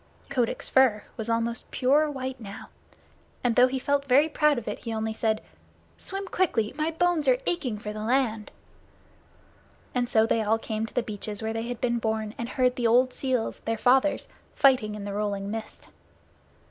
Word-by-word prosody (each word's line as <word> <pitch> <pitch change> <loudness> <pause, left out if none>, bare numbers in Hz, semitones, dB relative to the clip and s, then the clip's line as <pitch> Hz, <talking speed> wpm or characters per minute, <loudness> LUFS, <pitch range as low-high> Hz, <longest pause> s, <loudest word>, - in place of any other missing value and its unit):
Kotick's 250 -4 -1
fur 255 -6 +4
was 220 0 -5
almost 230 +1 -1
pure 285 +4 +3
white 260 -2 -5
now, 200 -3 -9 0.7
and 240 -2 +2
though 250 0 +7
he 265 +1 -2
felt 280 +2 0
very 275 +4 +5
proud 300 -2 +2
of 235 - -5
it, - - -3
he 230 - -6
only 220 0 -2
said, 220 -1 0 0.5
"Swim 390 +1 -6
quickly! 300 - 0
My 310 +2 0
bones 330 -2 +1
are 255 -1 +5
aching 270 -11 -1
for 210 0 -6
the 215 - -6
land." 225 -3 0 1.4
And 245 -1 0
so 220 0 +4
they 225 0 +1
all 220 +1 +2
came 220 0 -3
to - - -14
the 245 - +1
beaches 210 0 -6
where 220 0 -2
they 225 +1 -3
had 245 -2 -5
been 240 -1 0
born, 220 -1 -2
and 235 0 -3
heard 255 -1 +1
the 240 -2 +2
old 250 +3 +4
seals, 255 -4 -1
their 225 0 -1
fathers, 265 +5 +3 0.3
fighting 250 -6 +3
in 210 - -7
the 200 0 -4
rolling 200 -1 -2
mist. 220 0 -7
235 Hz, 185 wpm, -27 LUFS, 220-265 Hz, 1.4 s, though